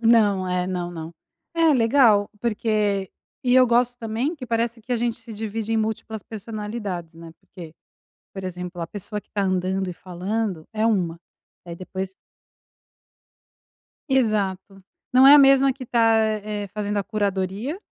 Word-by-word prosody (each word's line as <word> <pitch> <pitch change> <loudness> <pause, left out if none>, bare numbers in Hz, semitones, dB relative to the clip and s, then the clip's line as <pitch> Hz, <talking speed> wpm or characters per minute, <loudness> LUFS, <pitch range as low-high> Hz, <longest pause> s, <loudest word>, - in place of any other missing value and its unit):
Não, 210 -5 +4
é. 180 0 0
Não, 180 -2 -3
não. 165 -1 -7 0.4
É, 330 -2 +4
legal, 230 -4 +4
porque 210 -4 0 0.3
e 250 -1 +2
eu 255 -1 +7
gosto 245 +1 +2
também, 230 +8 -2
que 255 -4 -8
parece 230 0 -1
que 250 +3 -4
a - - +2
gente 235 0 -1
se 230 0 -11
divide 220 +1 -4
em 225 - +2
múltiplas 220 -1 -3
personalidades, 210 -5 -6
né, 165 0 -11
porque, 165 -4 -12 0.6
por 195 - -7
exemplo, 180 -1 -6
a 165 - -3
pessoa 210 +2 -5
que - - -27
tá 205 - -1
andando 185 0 0
e - - -5
falando 185 0 -3
é 215 +1 0
uma, 175 -7 0 0.5
aí 170 -1 -7
depois 190 +1 -6 2.0
Exato, 200 -6 0 0.3
não 260 +1 +7
é 275 - +10
a 295 - +10
mesma 275 0 +6
que 260 -1 -8
tá, 225 -1 +3 0.3
eh, 210 -1 -4
fazendo 205 -1 -2
a 200 - 0
curadoria 205 - -2
210 Hz, 155 wpm, -23 LUFS, 185-230 Hz, 2.0 s, é